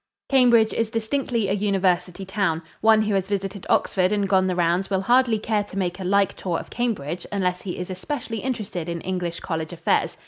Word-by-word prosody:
Cambridge 240 Hz, -5 st, +5 dB
is 225 Hz, -1 st, 0 dB
distinctly 230 Hz, 0 st, -1 dB
a -, -, +1 dB
university 195 Hz, -2 st, 0 dB
town. 190 Hz, -5 st, -1 dB, 0.2 s
One 220 Hz, 0 st, +5 dB
who 210 Hz, -1 st, 0 dB
has 195 Hz, -1 st, 0 dB
visited 195 Hz, -1 st, -3 dB
Oxford 185 Hz, 0 st, +2 dB
and 205 Hz, -1 st, +1 dB
gone 190 Hz, -1 st, +3 dB
the 185 Hz, -, 0 dB
rounds 175 Hz, +2 st, +1 dB
will 190 Hz, -1 st, +1 dB
hardly 240 Hz, +1 st, +3 dB
care 215 Hz, -1 st, 0 dB
to 195 Hz, -, -9 dB
make 180 Hz, -1 st, -1 dB
a -, -, -4 dB
like 200 Hz, +1 st, +2 dB
tour 175 Hz, -3 st, -2 dB
of -, -, -8 dB
Cambridge 180 Hz, -, -2 dB
unless 180 Hz, -3 st, -1 dB
he 185 Hz, -, -5 dB
is 180 Hz, +1 st, -5 dB
especially 225 Hz, +3 st, -4 dB
interested 200 Hz, -9 st, -4 dB
in 170 Hz, -1 st, -4 dB
English 180 Hz, -2 st, -3 dB
college 160 Hz, -1 st, -3 dB
affairs. 170 Hz, -, 0 dB
195 Hz, 200 wpm, -24 LUFS, 180-220 Hz, 0.2 s, Cambridge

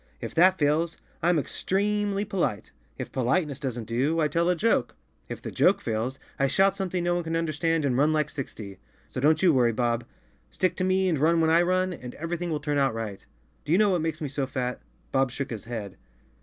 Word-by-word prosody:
If -, -, -6 dB
that 185 Hz, +3 st, +5 dB
fails, 160 Hz, +2 st, +1 dB, 0.2 s
Pm 175 Hz, 0 st, +3 dB
extree—mly 205 Hz, +5 st, 0 dB
polite. 180 Hz, -, -2 dB, 0.3 s
If -, -, -6 dB
po¬ 130 Hz, -, -2 dB
liteness 145 Hz, +2 st, 0 dB
doesn't 125 Hz, -5 st, -3 dB
do, 130 Hz, +9 st, 0 dB
I 155 Hz, -, +3 dB
tell 170 Hz, +2 st, +1 dB
a 180 Hz, -, +3 dB
joke. 225 Hz, +6 st, +1 dB, 0.3 s
If -, -, -7 dB
the -, -, -5 dB
joke 190 Hz, -, +3 dB
fails, 115 Hz, +4 st, -2 dB, 0.2 s
I 135 Hz, -, +3 dB
shout 195 Hz, +8 st, +3 dB
something 185 Hz, -2 st, -2 dB
no 175 Hz, 0 st, +1 dB
one 175 Hz, 0 st, -1 dB
can 165 Hz, 0 st, -3 dB
understand 165 Hz, -1 st, 0 dB
and 130 Hz, -3 st, +1 dB
rim 145 Hz, +4 st, +3 dB
like 150 Hz, -1 st, 0 dB
sixty. 110 Hz, -, -7 dB, 0.3 s
So 130 Hz, -, -5 dB
don't 155 Hz, +4 st, +3 dB
you 175 Hz, -4 st, +6 dB
worry, 120 Hz, -3 st, +3 dB
Bob; 120 Hz, 0 st, 0 dB, 0.4 s
stick 185 Hz, -2 st, 0 dB
to 185 Hz, -, 0 dB
me 185 Hz, 0 st, +2 dB
and 165 Hz, -6 st, +1 dB
run 165 Hz, +3 st, +3 dB
when 160 Hz, 0 st, +3 dB
I 165 Hz, +1 st, +5 dB
run 185 Hz, +1 st, +1 dB
and 125 Hz, -6 st, -9 dB
everything 170 Hz, +2 st, -3 dB
will 155 Hz, -2 st, -1 dB
turn 145 Hz, -1 st, -1 dB
out 135 Hz, -4 st, +2 dB
right. 110 Hz, -3 st, -5 dB, 0.4 s
Do 145 Hz, -, -5 dB
you 175 Hz, -, +5 dB
know 210 Hz, 0 st, +4 dB
what 180 Hz, -4 st, +1 dB
makes 160 Hz, -1 st, -3 dB
me 150 Hz, -, -2 dB
so 140 Hz, 0 st, -2 dB
fat?" 125 Hz, -1 st, -3 dB, 0.3 s
Bob 135 Hz, -1 st, +2 dB
shook 135 Hz, +1 st, -5 dB
his 110 Hz, -4 st, -6 dB
head. 110 Hz, -5 st, -6 dB
155 Hz, 225 wpm, -26 LUFS, 130-175 Hz, 0.4 s, you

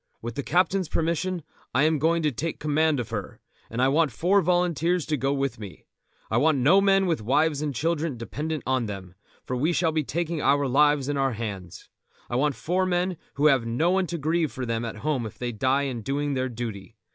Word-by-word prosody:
With 120 Hz, 0 st, -6 dB
the 140 Hz, -, -3 dB
captain's 180 Hz, +4 st, +1 dB
permission 170 Hz, +1 st, -1 dB, 0.3 s
I 135 Hz, -, +4 dB
am 155 Hz, -1 st, +2 dB
going 165 Hz, +2 st, +2 dB
to 150 Hz, -, +2 dB
take 155 Hz, +6 st, -4 dB
command 155 Hz, -1 st, +1 dB
of 115 Hz, -2 st, -5 dB
her, 105 Hz, -4 st, -5 dB, 0.3 s
and 115 Hz, -, -5 dB
I 130 Hz, -, +4 dB
want 155 Hz, 0 st, +2 dB
four 185 Hz, -, +2 dB
volunteers 175 Hz, -1 st, +1 dB
to 155 Hz, -, 0 dB
go 135 Hz, 0 st, 0 dB
with 140 Hz, -4 st, -1 dB
me. 100 Hz, -4 st, -10 dB, 0.5 s
I -, -, +2 dB
want 155 Hz, -1 st, +3 dB
no 155 Hz, +10 st, +5 dB
men 195 Hz, -1 st, +4 dB
with 165 Hz, -9 st, 0 dB
wives 145 Hz, +6 st, +1 dB
and 150 Hz, -1 st, -1 dB
children 155 Hz, +1 st, -1 dB
dependent 150 Hz, +6 st, -4 dB
upon 130 Hz, -3 st, 0 dB
them, 95 Hz, -3 st, -7 dB, 0.3 s
for 125 Hz, -, -3 dB
we 150 Hz, +7 st, +1 dB
shall 165 Hz, -1 st, +1 dB
be 155 Hz, -1 st, 0 dB
taking 165 Hz, +2 st, -2 dB
our 140 Hz, 0 st, +3 dB
lives 145 Hz, +1 st, +3 dB
in 145 Hz, -1 st, -1 dB
our 135 Hz, -2 st, +1 dB
hands. 100 Hz, -6 st, -6 dB, 0.4 s
I -, -, -1 dB
want 140 Hz, +2 st, +1 dB
four 185 Hz, +3 st, 0 dB
men 180 Hz, 0 st, 0 dB, 0.2 s
who 145 Hz, -, +1 dB
have 135 Hz, -6 st, +4 dB
no 155 Hz, +10 st, +1 dB
one 190 Hz, -1 st, +1 dB
to 170 Hz, -, -3 dB
grieve 160 Hz, 0 st, 0 dB
for 130 Hz, -, -5 dB
them 115 Hz, -1 st, -2 dB
at 115 Hz, -, -5 dB
home 145 Hz, -6 st, 0 dB
if 105 Hz, -, -12 dB
they 125 Hz, -1 st, -3 dB
die 130 Hz, +5 st, +1 dB
in 130 Hz, -4 st, -3 dB
doing 140 Hz, +5 st, -1 dB
their 130 Hz, -1 st, -1 dB
duty. 115 Hz, -2 st, -6 dB
145 Hz, 220 wpm, -26 LUFS, 125-165 Hz, 0.5 s, no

